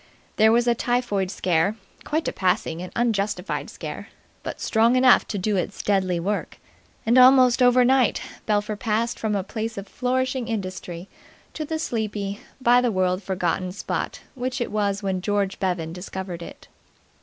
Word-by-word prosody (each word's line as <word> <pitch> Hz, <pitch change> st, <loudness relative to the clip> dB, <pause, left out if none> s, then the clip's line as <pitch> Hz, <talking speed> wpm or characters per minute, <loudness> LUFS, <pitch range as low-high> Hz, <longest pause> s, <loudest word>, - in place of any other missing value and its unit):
There 220 Hz, +1 st, +6 dB
was 240 Hz, +1 st, +3 dB
a 240 Hz, -, +5 dB
typhoid 235 Hz, -5 st, 0 dB
scare 185 Hz, +1 st, +1 dB, 0.3 s
quite 315 Hz, +2 st, -1 dB
a -, -, -1 dB
passing 180 Hz, -3 st, 0 dB
and 180 Hz, -, -7 dB
unjustified 205 Hz, -5 st, -1 dB
scare, -, -, -7 dB, 0.3 s
but -, -, -6 dB
strong 230 Hz, +2 st, +3 dB
enough 255 Hz, -1 st, +5 dB
to 205 Hz, -, -3 dB
do 200 Hz, +1 st, 0 dB
its 185 Hz, +2 st, -3 dB
deadly 190 Hz, -3 st, +1 dB
work; 200 Hz, +4 st, -3 dB, 0.5 s
and 240 Hz, +3 st, +5 dB
almost 255 Hz, -1 st, +6 dB
overnight 250 Hz, 0 st, +4 dB, 0.3 s
Belpher 210 Hz, 0 st, 0 dB
passed 225 Hz, +2 st, -1 dB
from 215 Hz, -2 st, -1 dB
a 195 Hz, -, -1 dB
place 220 Hz, +2 st, -5 dB
of 200 Hz, 0 st, -6 dB
flourishing 255 Hz, +1 st, -1 dB
industry 185 Hz, -5 st, -5 dB, 0.5 s
to 310 Hz, -, -4 dB
the 320 Hz, +2 st, -2 dB
sleepy, 210 Hz, -7 st, -3 dB, 0.2 s
by 245 Hz, -1 st, +5 dB
the 245 Hz, -2 st, +1 dB
world 185 Hz, -1 st, +1 dB
forgotten 185 Hz, -1 st, -1 dB
spot 195 Hz, -, -4 dB
which 255 Hz, 0 st, -3 dB
it 240 Hz, -, -2 dB
was 205 Hz, -1 st, -1 dB
when 190 Hz, -2 st, -1 dB
George 200 Hz, 0 st, -1 dB
Bevan 175 Hz, -4 st, -2 dB
discovered 180 Hz, -1 st, -6 dB
it. -, -, -10 dB
210 Hz, 160 wpm, -24 LUFS, 190-240 Hz, 0.5 s, There